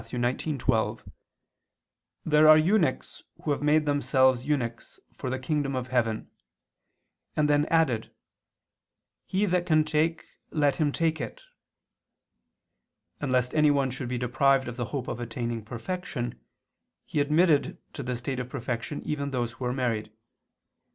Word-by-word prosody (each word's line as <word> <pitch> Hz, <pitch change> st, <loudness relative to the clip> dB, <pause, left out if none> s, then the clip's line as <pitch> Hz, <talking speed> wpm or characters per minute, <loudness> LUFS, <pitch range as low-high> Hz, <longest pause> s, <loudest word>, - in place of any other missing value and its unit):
19:12): 125 Hz, -1 st, -1 dB, 1.1 s
"There 155 Hz, 0 st, +5 dB
are 155 Hz, -, +10 dB
eunuchs 175 Hz, +2 st, +1 dB, 0.2 s
who 150 Hz, -, 0 dB
have 140 Hz, -, -1 dB
made 150 Hz, +1 st, +3 dB
themselves 130 Hz, -3 st, +3 dB
eunuchs, 125 Hz, -6 st, -3 dB
for 130 Hz, -, -5 dB
the 130 Hz, -, -1 dB
kingdom 140 Hz, 0 st, -1 dB
of 130 Hz, 0 st, -3 dB
heaven," 115 Hz, -4 st, 0 dB, 1.1 s
and 150 Hz, -1 st, +2 dB
then 145 Hz, 0 st, +3 dB
added: 135 Hz, -9 st, +2 dB, 1.2 s
"He 195 Hz, +2 st, +1 dB
that 180 Hz, -2 st, 0 dB
can 155 Hz, -2 st, +4 dB
take, 155 Hz, +2 st, 0 dB, 0.2 s
let 145 Hz, -3 st, +1 dB
him 150 Hz, -3 st, +2 dB
take 160 Hz, +1 st, 0 dB
it." -, -, -7 dB, 1.8 s
And 145 Hz, -3 st, -2 dB
lest 125 Hz, -1 st, +1 dB
anyone 145 Hz, -4 st, +3 dB
should 130 Hz, -1 st, -5 dB
be 125 Hz, -, -2 dB
deprived 130 Hz, +2 st, +2 dB
of 120 Hz, -, -5 dB
the 120 Hz, -1 st, -2 dB
hope 130 Hz, +1 st, -4 dB
of -, -, -4 dB
attaining 120 Hz, -1 st, -4 dB
perfection, 120 Hz, -, -5 dB, 0.6 s
he -, -, -2 dB
admitted 155 Hz, +3 st, +3 dB, 0.2 s
to -, -, -5 dB
the 125 Hz, -1 st, -3 dB
state 125 Hz, +2 st, -4 dB
of 125 Hz, 0 st, -5 dB
perfection 125 Hz, +3 st, -4 dB
those -, -, -13 dB
even 140 Hz, -1 st, -2 dB
who 120 Hz, 0 st, -3 dB
were 125 Hz, -, 0 dB
married. 115 Hz, -5 st, -1 dB
135 Hz, 140 wpm, -27 LUFS, 125-155 Hz, 1.8 s, are